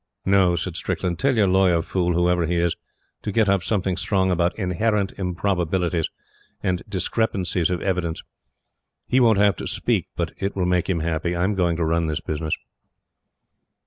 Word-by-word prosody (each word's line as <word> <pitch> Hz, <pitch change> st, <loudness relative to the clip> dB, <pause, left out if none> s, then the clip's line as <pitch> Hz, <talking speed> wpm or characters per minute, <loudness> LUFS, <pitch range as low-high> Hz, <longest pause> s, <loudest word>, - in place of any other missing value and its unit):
"No," 95 Hz, -2 st, +4 dB
said 80 Hz, -, -3 dB
Strickland. 85 Hz, -2 st, -2 dB
"Tell 135 Hz, -1 st, +2 dB
your 105 Hz, -, +5 dB
lawyer 90 Hz, -3 st, +3 dB
fool, 90 Hz, -1 st, 0 dB
whoever 90 Hz, -1 st, +2 dB
he 85 Hz, -, 0 dB
is, 85 Hz, -1 st, +1 dB, 0.5 s
to 105 Hz, -, -3 dB
get 110 Hz, +1 st, +2 dB
up 100 Hz, -1 st, +3 dB
something 95 Hz, -1 st, 0 dB
strong 95 Hz, 0 st, +1 dB
about 85 Hz, 0 st, +1 dB
'inherent 100 Hz, +1 st, 0 dB
improbabilities' 90 Hz, -2 st, 0 dB, 0.5 s
and 90 Hz, -1 st, 0 dB
'discrepancies 95 Hz, -3 st, 0 dB
of 90 Hz, -1 st, -2 dB
evidence.' 90 Hz, -4 st, -1 dB, 0.8 s
He 130 Hz, -, +2 dB
won't 115 Hz, -4 st, +5 dB
have 100 Hz, 0 st, +3 dB
to -, -, -5 dB
speak, -, -, 0 dB
but -, -, -2 dB
it 100 Hz, +1 st, -2 dB
will 95 Hz, -2 st, 0 dB
make 90 Hz, 0 st, +1 dB
him 85 Hz, -4 st, 0 dB
happy. 85 Hz, +1 st, -1 dB
I'M 90 Hz, +4 st, +1 dB
going 90 Hz, -3 st, +1 dB
to 85 Hz, 0 st, 0 dB
run 85 Hz, +1 st, +1 dB
this 75 Hz, -2 st, -1 dB
business." 80 Hz, 0 st, -2 dB
90 Hz, 170 wpm, -23 LUFS, 85-95 Hz, 0.8 s, your